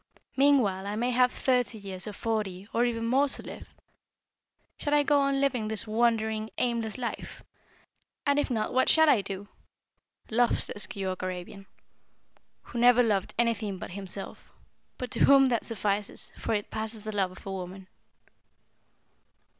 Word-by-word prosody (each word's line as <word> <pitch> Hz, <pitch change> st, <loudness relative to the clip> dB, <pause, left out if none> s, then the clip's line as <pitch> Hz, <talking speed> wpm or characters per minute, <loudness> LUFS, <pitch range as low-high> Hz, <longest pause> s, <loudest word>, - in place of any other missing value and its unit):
Meanwhile, 245 Hz, -9 st, +3 dB
I 205 Hz, -, -2 dB
may 240 Hz, +3 st, 0 dB
have 250 Hz, 0 st, +4 dB
thirty 250 Hz, -3 st, 0 dB
years, 195 Hz, -1 st, -7 dB
or 210 Hz, -, -5 dB
forty, 205 Hz, -3 st, -3 dB
or 235 Hz, +1 st, +3 dB
even 230 Hz, -1 st, -1 dB
more 270 Hz, +4 st, +3 dB
to -, -, -7 dB
live. -, -, -10 dB, 1.0 s
Shall 295 Hz, 0 st, +1 dB
I 295 Hz, -, +4 dB
go 285 Hz, 0 st, +3 dB
on 275 Hz, -1 st, +1 dB
living 255 Hz, -6 st, +1 dB
this 220 Hz, +1 st, -2 dB
wandering, 220 Hz, -1 st, +1 dB
aimless 235 Hz, -2 st, -1 dB
life? 245 Hz, -2 st, -5 dB, 0.8 s
And 285 Hz, 0 st, +3 dB
if 290 Hz, -, 0 dB
not 220 Hz, -4 st, -1 dB
what 260 Hz, +1 st, +3 dB
shall 315 Hz, 0 st, +6 dB
I 250 Hz, -8 st, +5 dB
do? 195 Hz, 0 st, -6 dB, 0.8 s
Love, 240 Hz, +2 st, +2 dB
says 205 Hz, -2 st, 0 dB
Keyork 190 Hz, -1 st, -4 dB
Arabian 185 Hz, +1 st, -6 dB, 1.0 s
who 240 Hz, -, -6 dB
never 245 Hz, +1 st, +6 dB
loved 205 Hz, -5 st, 0 dB
anything 220 Hz, -4 st, 0 dB
but -, -, -7 dB
himself, 195 Hz, +1 st, -7 dB, 0.5 s
but 250 Hz, -2 st, -5 dB
to -, -, +4 dB
whom 275 Hz, -1 st, +6 dB
that 235 Hz, -3 st, -1 dB
suffices, 205 Hz, -2 st, -2 dB
for 225 Hz, -, -1 dB
it 205 Hz, -, -3 dB
passes 220 Hz, 0 st, -3 dB
the 215 Hz, -1 st, -5 dB
love 195 Hz, -2 st, +1 dB
of 185 Hz, -, -14 dB
woman!" 190 Hz, 0 st, -6 dB
220 Hz, 155 wpm, -28 LUFS, 200-245 Hz, 1.0 s, shall